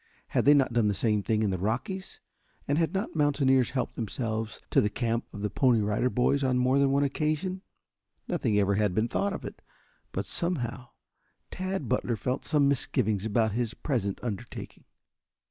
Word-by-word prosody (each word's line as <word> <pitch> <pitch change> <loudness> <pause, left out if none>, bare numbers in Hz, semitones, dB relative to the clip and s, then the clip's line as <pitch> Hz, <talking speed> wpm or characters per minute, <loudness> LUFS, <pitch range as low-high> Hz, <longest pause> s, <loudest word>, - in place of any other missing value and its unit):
Had - - +1
they 145 +1 +7
not 135 -4 +2
done 115 -3 +3
the 100 - +1
same 105 +1 +1
thing 110 +2 0
in 105 - +1
the 95 - -2
Rockies, 130 - -3 0.5
and 145 +3 +1
had 165 - +1
not 195 0 -3
mountaineers 140 -4 +3
helped 130 -2 -2
themselves 110 -1 -3
to - - +5
the 105 - +1
camp 115 +2 -1
of 100 - -7
the 105 - 0
Pony 125 0 +3
Rider 105 +4 +1
Boys 135 +3 +1
on 130 -1 +2
more 130 +2 +3
than 140 -1 +4
one 140 +1 +2
occasion? 155 +6 -1 0.7
Nothing 105 - 0
ever 100 -1 +3
had 100 -2 +1
been 110 +3 +2
thought 200 +10 0
of - - -5
it, - - -8 0.5
but - - -3
somehow 130 -8 -2 0.6
Tad 185 -6 -3
Butler 125 -1 0
felt 125 +4 -3
some 145 -3 +3
misgivings 110 -6 +1
about 110 0 +2
his 120 +2 -2
present 110 -9 -2
undertaking. 105 -6 -6
125 Hz, 180 wpm, -28 LUFS, 110-140 Hz, 0.7 s, they